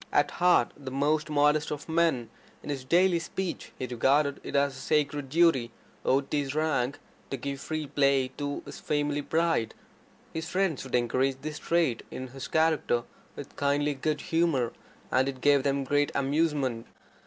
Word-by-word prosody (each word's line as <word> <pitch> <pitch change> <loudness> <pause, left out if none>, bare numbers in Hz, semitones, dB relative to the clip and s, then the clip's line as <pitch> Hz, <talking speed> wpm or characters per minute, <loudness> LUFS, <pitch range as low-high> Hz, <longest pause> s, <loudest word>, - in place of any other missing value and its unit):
At - - +3
heart 175 -9 +4
the 140 -2 -8
most 150 +3 0
modest 150 +1 +3
of 145 -1 -5
men, 160 -8 +1 0.3
in - - -4
his 135 -2 -4
daily 175 +5 +3
speech 180 +2 -4
he 130 - -3
regarded 140 +4 +2
it - - -6
as 140 -1 +2
a - - -9
sacred 145 -1 0
duty, 155 -6 +3 0.3
owed 135 +1 +1
to 150 - +1
his 140 -1 -2
rank, 145 -4 0 0.3
to 135 - -3
give 140 +2 -5
free 155 -1 -3
play 140 -2 +2
to 145 -1 -3
his - - -9
family 145 -1 -1
pride. 160 -7 0 0.6
His 160 0 -4
friends 185 -6 0
would 130 - -2
encourage 130 +3 +1
this 155 0 -5
trait 165 -9 +1
in 130 0 -6
his 135 +1 -7
character 160 -7 +2 0.3
with - - -9
kindly 145 +1 +1
good 150 +2 -2
humour, 160 -8 +1 0.4
and 130 +1 +3
it 130 -1 -6
gave 145 0 +4
them 140 0 0
great 145 +1 +1
amusement. 140 -4 0
145 Hz, 170 wpm, -28 LUFS, 135-155 Hz, 0.6 s, heart